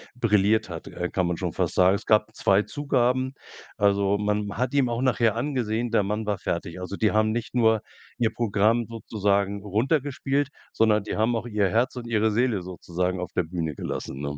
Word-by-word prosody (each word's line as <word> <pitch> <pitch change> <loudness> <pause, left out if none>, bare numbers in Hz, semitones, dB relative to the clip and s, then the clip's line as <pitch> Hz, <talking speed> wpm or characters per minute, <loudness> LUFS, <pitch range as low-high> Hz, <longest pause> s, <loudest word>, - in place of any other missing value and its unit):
brilliert 110 -3 +2
hat, 85 -2 -7
äh, 90 0 -4
kann 95 -2 0
man 90 - -1
schon - - -2
fast - - -1
sagen. 95 +2 +5
Es - - -6
gab 110 0 +3
2 100 +1 +3
Zugaben. 130 0 0 0.4
Also, 100 0 +2
man 105 0 -1
hat 125 +2 -1
ihm 135 -3 +3
auch 120 +1 -2
nachher 120 -4 +2
angesehen, 120 -3 -1
der 110 -3 +3
Mann 105 +2 -2
war 105 -2 -1
fertig. 85 0 -4
Also, 90 +2 -5
die 110 0 +2
haben 110 0 +2
nicht 120 +2 -3
nur 110 -3 +4 0.4
ihr 115 -3 +1
Programm 115 +1 +2
sozusagen 100 -3 -1
runtergespielt, 135 - 0 0.2
sondern 110 -2 +3
die - - -4
haben 115 +2 +1
auch 115 - -5
ihr 105 -4 +1
Herz 120 +5 +1
und 125 - -6
ihre 110 -1 +2
Seele 115 -3 +1
sozusagen 90 0 -3
auf 90 - -5
der 90 - +2
Bühne 80 -2 -4
gelassen, 65 - -5
ne? 70 0 -4
110 Hz, 195 wpm, -25 LUFS, 100-120 Hz, 0.4 s, sagen